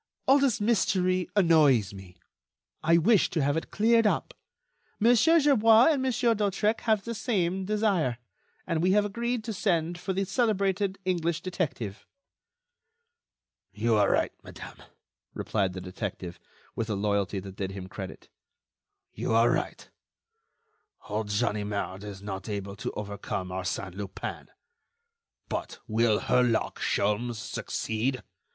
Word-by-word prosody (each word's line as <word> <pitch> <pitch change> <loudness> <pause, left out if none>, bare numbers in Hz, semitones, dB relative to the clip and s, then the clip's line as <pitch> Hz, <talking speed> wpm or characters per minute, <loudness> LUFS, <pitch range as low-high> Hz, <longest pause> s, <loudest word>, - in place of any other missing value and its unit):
All 275 +2 +6
this 270 -4 +2
mystery 185 -4 +1
annoys 150 - +4
me. 95 -2 -12 0.6
I 165 +1 +4
wish 195 +4 +4
to 160 -4 0
have 145 +1 +1
it 165 - -3
cleared 225 +1 +3
up. - - -1 0.7
Monsieur 245 +9 +5
Gerbois 235 -4 +6
and 285 -4 0
Monsieur 250 -2 +2
d'Hautrec 210 +1 0
have 215 -2 +3
the 235 - -3
same 190 -5 -1
desire, 200 - +1 0.5
and 165 -3 -1
we 185 +2 +3
have 205 0 +3
agreed 235 +3 -2
to 220 0 -4
send 175 -3 0
for 190 +2 -3
the 195 +1 0
celebrated 200 -3 0
English 170 -3 0
detective." 135 - -4 1.6
"You 110 +4 0
are 105 -2 +4
right, - - +1
madame," - - -11 0.5
replied 95 -4 -1
the 95 - -6
detective, 90 -1 -6 0.4
with 115 0 -3
a 105 - 0
loyalty 100 -1 0
that 95 0 -9
did 95 -2 -2
him 95 -1 -7
credit, 95 0 -8 0.9
"you 115 - -1
are 115 +1 +5
right. - - -3 1.2
Old 105 0 -2
Ganimard 105 -2 -2
is 100 -2 -8
not 95 +1 -6
able 100 -1 -4
to - - -4
overcome 100 -2 -5
Arsène 95 0 -4
Lupin. 100 0 -6 1.0
But - - -4
will 110 -1 +2
Herlock 125 -3 +1
Sholmes 105 +4 0
succeed? 115 +2 -3
155 Hz, 130 wpm, -28 LUFS, -, 1.6 s, All